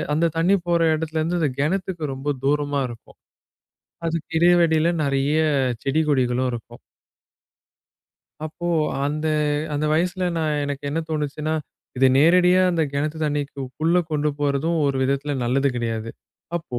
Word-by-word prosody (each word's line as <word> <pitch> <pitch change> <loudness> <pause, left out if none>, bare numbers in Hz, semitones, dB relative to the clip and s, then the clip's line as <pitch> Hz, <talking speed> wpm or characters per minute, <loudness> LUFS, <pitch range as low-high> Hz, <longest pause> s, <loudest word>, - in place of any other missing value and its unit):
அந்தத் 165 0 +1
தண்ணி 180 +4 +4
போற 170 -1 +2
இடத்துல 160 0 -3
இருந்து 170 +3 -1
அந்தக் 140 -5 -1
கிணத்துக்கு 170 -1 -2
ரொம்ப 140 +2 -2
தூரமா 145 0 +1
இருக்கும். 120 -1 -13 0.9
அதுக்கு 165 -1 -3
இடையில 175 0 +5
இடையில 160 +1 +2 0.2
நிறைய 140 +2 +1 0.5
செடி, 140 +3 +1
கொடிகளும் 130 -2 +1
இருக்கும். 120 0 -8 1.7
அப்போ 175 +2 -6 0.4
அந்த 150 +2 -2 0.5
அந்த 150 +1 0
வயசுல 180 +3 0
நான் 155 -2 0
எனக்கு 145 0 -5
என்ன 160 +3 -1
தோணுச்சுன்னா, 150 0 -2 0.4
இது 130 +1 +4
நேரடியா 180 +4 +5
அந்த 170 -2 +1
கிணத்து 150 +3 -2
தண்ணிக்கு 145 -1 -2
கு - - -3 0.2
குள்ள 165 +3 +2
கொண்டு 150 -1 0
போறதும் 145 +3 0
ஒரு 140 -1 +1
விதத்துல 140 +2 -1
நல்லது 135 +3 +2
கிடையாது. 115 -1 -3 0.5
அப்போ 160 -8 -5
150 Hz, 140 wpm, -22 LUFS, 140-165 Hz, 1.7 s, இடையில